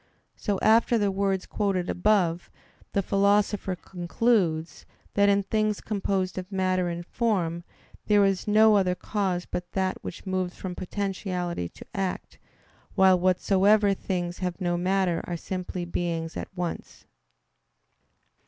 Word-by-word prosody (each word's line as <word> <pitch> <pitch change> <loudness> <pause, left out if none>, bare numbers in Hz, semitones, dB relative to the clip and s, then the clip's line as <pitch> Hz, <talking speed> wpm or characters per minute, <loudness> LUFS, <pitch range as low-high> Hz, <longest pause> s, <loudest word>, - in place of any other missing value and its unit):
So 205 -3 -1
after 230 +2 +5
the 205 -2 +1
words 195 -1 0
quoted 195 -4 -1
above, 180 -3 +1 0.4
the 200 - +1
Philosopher 200 0 +2
concludes, 175 -2 -1 0.3
that 200 0 +4
in 200 0 +3
things 215 +1 0
composed 195 -3 -2
of 185 +2 -9
matter 185 -2 +1
and 170 0 -5
form 175 -7 -1 0.4
"there 205 -1 +5
is 195 0 0
no 215 0 +6
other 180 -2 +2
cause 185 -3 -2
but 180 0 -6
that 190 -1 -1
which 175 - -7
moves 185 -1 -2
from 185 -2 -5
potentiality 180 - -3
to - - -13
act; 190 -2 -4 0.6
while 190 -1 +5
whatsoever 195 +3 +3
things 175 -2 -3
have 180 -1 -3
no 175 -2 0
matter 180 -1 +1
are 175 - -3
simply 180 0 -4
beings 170 -2 -3
at - - -4
once." 175 -2 -5
190 Hz, 135 wpm, -26 LUFS, 180-200 Hz, 0.6 s, no